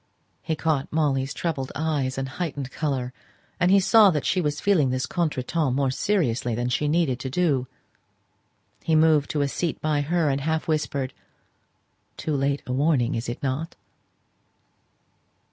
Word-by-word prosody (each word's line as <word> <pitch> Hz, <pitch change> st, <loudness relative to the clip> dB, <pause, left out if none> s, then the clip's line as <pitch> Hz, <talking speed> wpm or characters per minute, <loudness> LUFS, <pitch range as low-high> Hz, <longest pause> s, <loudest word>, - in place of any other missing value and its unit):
He 160 Hz, -, -2 dB
caught 155 Hz, -3 st, -1 dB
Molly's 140 Hz, -4 st, 0 dB
troubled 145 Hz, -6 st, -3 dB
eyes 145 Hz, -4 st, -1 dB
and 135 Hz, 0 st, -2 dB
heightened 145 Hz, -3 st, -4 dB
colour, 130 Hz, -5 st, -2 dB, 0.5 s
and 180 Hz, -, +3 dB
he 195 Hz, +1 st, +6 dB
saw 210 Hz, +2 st, +6 dB
that 150 Hz, -5 st, -1 dB
she 185 Hz, -, +1 dB
was 150 Hz, -2 st, -1 dB
feeling 180 Hz, -10 st, +3 dB
this 130 Hz, 0 st, -1 dB
contretemps 155 Hz, -3 st, -1 dB
more 135 Hz, -1 st, +1 dB
seriously 130 Hz, -, 0 dB
than 120 Hz, +1 st, -1 dB
she 150 Hz, +4 st, 0 dB
needed 150 Hz, -5 st, +1 dB
to 130 Hz, -, -4 dB
do. 140 Hz, -4 st, +1 dB, 1.2 s
He 160 Hz, -, +2 dB
moved 155 Hz, -2 st, +4 dB
to 150 Hz, -, 0 dB
a 140 Hz, -, +2 dB
seat 160 Hz, +4 st, -2 dB
by 150 Hz, -2 st, 0 dB
her, 165 Hz, +2 st, +1 dB
and 135 Hz, +1 st, -1 dB
half 160 Hz, +2 st, -1 dB
whispered, 145 Hz, -4 st, -1 dB, 1.0 s
"Too 155 Hz, -, -2 dB
late 140 Hz, +1 st, 0 dB
a 125 Hz, -, -3 dB
warning, 135 Hz, -3 st, +2 dB
is 115 Hz, +1 st, -3 dB
it 120 Hz, -, -6 dB
not?" 140 Hz, +5 st, -2 dB
145 Hz, 160 wpm, -25 LUFS, 130-160 Hz, 1.2 s, he